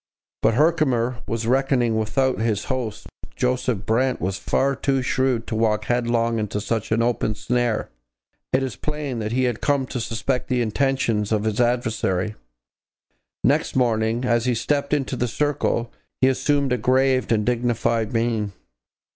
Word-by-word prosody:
But 115 - +3
Herkimer 130 -6 +2
was 115 0 -2
reckoning 125 -2 +2
without 130 +4 +1
his 110 -2 0
host. 120 -5 -4 0.3
Joseph 125 - 0
Brant 125 +3 +1
was 95 +3 -2
far 140 +1 +1
too 135 -1 0
shrewd 130 -3 0
to 110 - -4
walk 110 -1 +1
headlong 115 -1 +1
into 105 -1 -2
such 110 +1 -2
an 115 +1 +3
open 115 -3 0
snare. 120 0 -1 0.6
It 130 +1 +2
is 130 - -3
plain 150 -5 -4
that 110 0 -3
he 130 +2 +1
had 120 -3 -1
come 140 -2 +1
to 125 - -4
suspect 120 +3 -2
the 125 -2 0
intentions 115 -3 0
of 105 -1 +1
his 110 +1 0
adversary. 110 -5 0 1.1
Next - - +2
morning, 115 -1 +1
as 120 -1 +2
he 125 -1 +1
stepped 140 +4 -1
into 140 -3 0
the 125 0 -1
circle, 120 -2 -1 0.3
he 130 - +5
assumed 140 0 +1
a 125 - 0
grave 130 +2 +2
and 105 -2 +2
dignified 115 -2 0
mien. 115 -3 0
120 Hz, 155 wpm, -23 LUFS, 110-130 Hz, 1.1 s, he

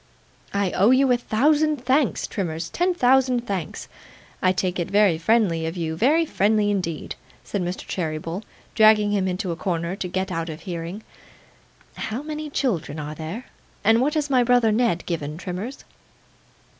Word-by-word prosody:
'I 200 -2 0
owe 200 +4 +3
you 260 +1 +4
a - - +5
thousand 290 +4 +1
thanks, 265 +1 +2
Trimmers, 165 -4 -4
ten 355 +1 +1
thousand 255 -3 +3
thanks. 190 -7 -4 0.5
I 185 - +4
take 185 -1 -1
it 175 - -2
very 200 -5 +3
friendly 170 -4 +2
of 165 +3 -5
you, 160 -2 -2
very 300 - +3
friendly 210 -5 +2
indeed,' 170 -6 -3 0.3
said 200 - -3
Mr. 180 +1 -4
Cheeryble, 165 +1 -3 0.3
dragging 215 -1 +5
him 195 -2 +1
into 180 0 -2
a - - -2
corner 170 +1 -2
to 185 - -3
get 185 +1 -2
out 165 -1 -3
of 155 +1 -7
hearing. 175 +4 -6 0.9
'How 230 +6 -4
many 305 0 -5
children 175 - -1
are 150 0 -5
there, 165 +10 -6 0.4
and 225 +2 +4
what 295 +4 +1
has 300 -2 0
my 255 -3 +3
brother 240 -2 +4
Ned 220 -6 +1
given, 155 -3 -3
Trimmers? 190 +9 -6
200 Hz, 165 wpm, -23 LUFS, 170-245 Hz, 0.9 s, a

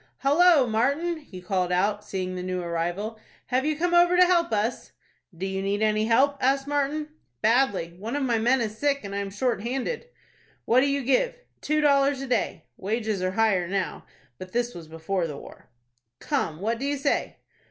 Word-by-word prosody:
"Hallo, 300 +1 +5
Martin!" 280 +10 0
he 185 -12 -12
called 180 -1 -1
out, 205 +3 +1
seeing 185 -1 -4
the 180 - -4
new 185 0 -3
arrival; 175 +6 -3 0.3
"have 260 +3 +1
you 310 -1 0
come 350 +2 0
over 350 +1 +5
to 365 - +7
help 345 -5 +2
us?" 220 +3 -2 0.4
"Do 185 - -3
you 190 0 -2
need 200 +2 -1
any 215 0 +2
help?" 270 +5 +3
asked 270 +1 +2
Martin. 290 +1 -1 0.3
"Badly. 220 -8 +2
One 225 +6 -4
of 290 - -1
my 235 -3 +1
men 245 +3 +3
is 215 -2 -3
sick, 280 +4 0
and 200 -1 -6
I 200 - -2
am 200 -1 -3
shorthanded." 250 - -2 0.6
"What 240 - +4
do 275 - +3
you 280 -1 0
give?" 370 - +2 0.3
"Two 305 0 +1
dollars 280 -1 +3
a 270 - -4
day." 250 - -1
Wages 215 -1 -2
are 185 0 -1
higher 200 -5 +2
now, 190 0 -3 0.4
but 185 0 -9
this 240 0 0
was 165 -2 -10
before 165 +3 -2
the 150 -3 -7
war. - - -13 0.5
"Come, 155 +1 -2
what 230 +3 -1
do 275 - -3
you 285 0 -1
say?" 280 +1 -1
230 Hz, 195 wpm, -26 LUFS, 195-280 Hz, 0.6 s, to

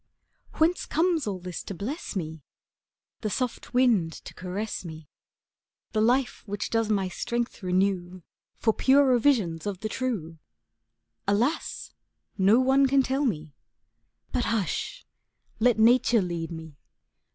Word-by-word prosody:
Whence 330 +3 +1
comes 325 -4 +1
all 195 -2 -2
this 180 -1 -6
to 195 - -7
bless 245 - -5
me, 160 -4 -4 0.8
The 215 - -2
soft 250 +3 -3
wind 220 -11 +3
to - - -9
caress 190 +4 -4
me, 160 -3 -9 0.8
The 215 - +1
life 250 +3 +2
which 205 0 -4
does 225 -1 +1
my 195 -3 +1
strength 235 +6 -3
renew 185 -1 0 0.3
For 220 - +2
purer 265 -1 +4
visions 205 - +1
of 195 -3 -4
the 215 - -2
true? 200 -12 -3 0.9
Alas! 230 +10 0 0.4
no 200 +4 +5
one 270 +1 +4
can 270 0 +4
tell 270 +3 0
me. 155 - -2 0.8
But, 245 -2 0
hush! 220 -6 -2 0.5
let 240 0 +4
Nature 230 -1 +5
lead 170 -2 -3
me. 160 -3 -9
215 Hz, 130 wpm, -27 LUFS, 180-255 Hz, 0.9 s, no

